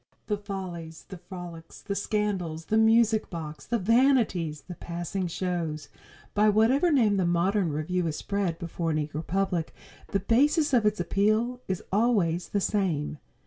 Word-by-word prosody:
The 210 - -1
Follies, 180 -5 -7
the 190 - -8
Frolics, 175 -2 -9
the 200 - -4
Scandals, 200 -6 -2
the 220 - +1
Music 220 0 +4
Box, 155 -3 -7
the 235 - +1
Vanities, 225 - +2
the 180 - -9
Passing 175 +2 -4
Shows 170 -3 -3 0.4
by 210 +1 +4
whatever 245 - +4
name 220 -8 +3
the 185 - +2
modern 175 +1 +1
revue 170 +4 -1
is 155 - -2
spread 195 -3 -2
before 170 0 -3
an 155 - +1
eager 150 0 -3
public, 180 -1 -1 0.3
the 195 - 0
basis 290 - +3
of 230 -4 +4
its 210 -1 0
appeal 215 +7 +1
is 190 -2 -3
always 195 -6 +2
the 200 - 0
same. 170 -8 -1
190 Hz, 155 wpm, -27 LUFS, 170-215 Hz, 0.4 s, Music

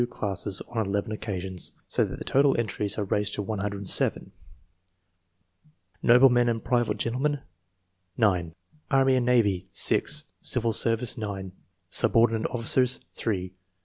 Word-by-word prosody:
classes 100 -2 -2
on 115 -2 -1
eleven 100 +2 -2
occcasions, 95 -4 -5
so - - +1
that - - -5
the - - -8
total 140 0 +3
entries 105 -2 -1
are 105 - -1
raised 105 +1 0
to - - -3
107: 100 -1 0 0.8
— 90 - -39
jN'oblemen 120 0 +5
and 115 -1 -2
private 120 -2 0
gentlemen 135 +4 -1 0.8
9 90 -7 +1 0.3
Anny 135 -2 +3
and 125 -1 0
navy, 105 -7 +1
6; 150 +1 +2 0.2
civil 115 -3 +1
service, 115 +1 +2
9; 100 -3 -5 0.4
subordi 115 0 +4
nate 110 -1 -1
officers, 125 +1 +1
3............ 95 -5 -3
110 Hz, 130 wpm, -26 LUFS, 95-120 Hz, 0.8 s, jN'oblemen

